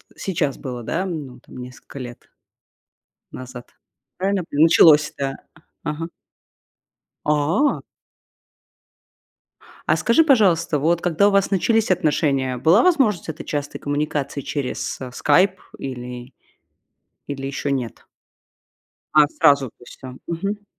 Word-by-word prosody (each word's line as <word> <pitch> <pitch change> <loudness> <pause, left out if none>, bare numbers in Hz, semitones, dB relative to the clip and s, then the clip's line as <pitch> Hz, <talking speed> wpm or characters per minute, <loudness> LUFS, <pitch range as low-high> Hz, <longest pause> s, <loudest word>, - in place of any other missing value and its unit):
сейчас 155 -7 -2
было, 125 -4 -6
да, 180 +10 -2
ну 145 -8 -6
там, - - -15
несколько 125 +2 -11
лет 120 -2 -9 1.0
назад? 125 -1 -9 0.5
Правильно 195 +1 0
я - - -5
пони 145 +2 +2
началось 160 -2 +6
да, 135 -1 -2 0.5
ага? 160 +2 -4 1.1
А? 150 - +1 2.1
А - - +3
скажи, 275 +8 +3
пожалуйста, 190 - +3
вот 170 +4 +1
когда 180 +4 +3
у - - +2
вас 200 -1 +2
начались 220 +2 +1
отношения, 145 -6 +1
была 160 - +4
возможность 265 - +2
этой 160 +1 -6
частой 145 -1 -4
коммуникации 145 -1 -2
через, 135 -1 -4
э, 130 -1 -6
"Скайп" 180 +8 +2 0.2
или 125 -1 -7 1.0
или 135 -1 -4
ещё 140 +1 -3
нет? 130 -5 -4 1.1
А, 150 -1 +6
сразу, 140 -5 +3
то - - -54
есть - - -14
он? 130 0 -8
Мгм. 200 +5 -4
150 Hz, 120 wpm, -21 LUFS, 135-180 Hz, 2.1 s, началось